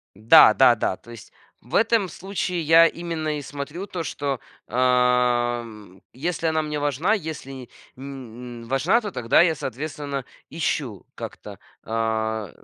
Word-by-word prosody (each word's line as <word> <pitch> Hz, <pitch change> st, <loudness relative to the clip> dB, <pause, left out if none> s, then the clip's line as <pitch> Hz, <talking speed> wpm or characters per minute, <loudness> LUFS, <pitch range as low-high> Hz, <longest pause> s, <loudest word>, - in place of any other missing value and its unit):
Да-да-да. 110 Hz, 0 st, +6 dB
То 120 Hz, -, -16 dB
есть 115 Hz, -3 st, -12 dB, 0.3 s
в 125 Hz, +9 st, -7 dB
этом 225 Hz, -3 st, +3 dB
случае 180 Hz, 0 st, -3 dB
я 165 Hz, +1 st, +6 dB
именно 160 Hz, -3 st, -3 dB
и -, -, -5 dB
смотрю 145 Hz, +6 st, -6 dB
то, 180 Hz, -4 st, -5 dB
что, 140 Hz, -4 st, -3 dB, 0.3 s
ам, 120 Hz, -5 st, +1 dB
если 165 Hz, +5 st, -2 dB
она 160 Hz, 0 st, +1 dB
мне 150 Hz, -1 st, -3 dB
важна, 145 Hz, -, +1 dB
если 160 Hz, -8 st, -4 dB
и, 130 Hz, -3 st, -9 dB, 0.3 s
м 125 Hz, -3 st, -9 dB
м- 115 Hz, -, -12 dB
важна, 160 Hz, -, +2 dB
то 210 Hz, -, -5 dB
тогда 120 Hz, 0 st, +3 dB
я, 170 Hz, -2 st, +3 dB
соответственно, 140 Hz, 0 st, -5 dB, 0.3 s
ищу 140 Hz, -, -3 dB
как-то, -, -, -9 dB, 0.2 s
а, 110 Hz, -2 st, -2 dB
135 Hz, 140 wpm, -23 LUFS, 120-160 Hz, 0.3 s, Да-да-да